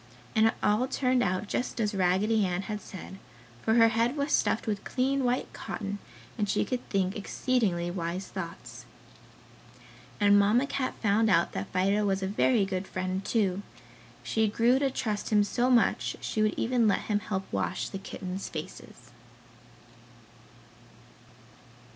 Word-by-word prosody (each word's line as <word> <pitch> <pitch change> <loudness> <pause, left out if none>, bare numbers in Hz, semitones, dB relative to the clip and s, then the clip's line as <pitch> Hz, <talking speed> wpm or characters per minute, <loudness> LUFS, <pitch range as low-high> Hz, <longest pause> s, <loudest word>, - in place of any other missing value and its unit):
And 220 0 +5
it 225 - 0
all 215 +5 +2
turned 255 -1 +1
out 185 -1 0
just 245 +3 -3
as 210 -1 0
Raggedy 195 +4 +2
Ann 180 0 -1
had 210 0 -5
said, 190 0 -10 0.4
for 220 - +2
her 230 -1 +6
head 230 +5 +1
was 285 +1 -1
stuffed - - +2
with 205 -2 -2
clean 270 +1 0
white 245 0 -1
cotton, 205 -1 -5 0.4
and 205 -1 0
she - - +1
could 250 -1 -3
think 190 -1 0
exceedingly 200 -5 0
wise 175 +1 -3
thoughts. 170 -3 -8 1.3
And 205 -1 +6
Mamma 215 +6 +3
Cat 275 -2 -2
found 220 +1 +3
out 170 -4 +3
that 95 - -5
Fido 195 +3 +2
was 195 -1 0
a - - 0
very 210 +2 +2
good 190 0 -3
friend, 185 +1 -3
too. 200 -3 0 0.6
She 220 -1 +1
grew 235 +5 +3
to 275 -1 +2
trust 215 -5 -3
him 210 -1 +4
so 245 +4 0
much 240 -3 +2
she 215 - -2
would 215 0 +2
even 240 -2 +2
let 205 - +2
him 210 -1 0
help 195 -2 -3
wash 95 -4 -1
the 195 - -6
kittens' 190 0 -6
faces. 125 -6 -9
205 Hz, 155 wpm, -28 LUFS, 190-230 Hz, 1.3 s, her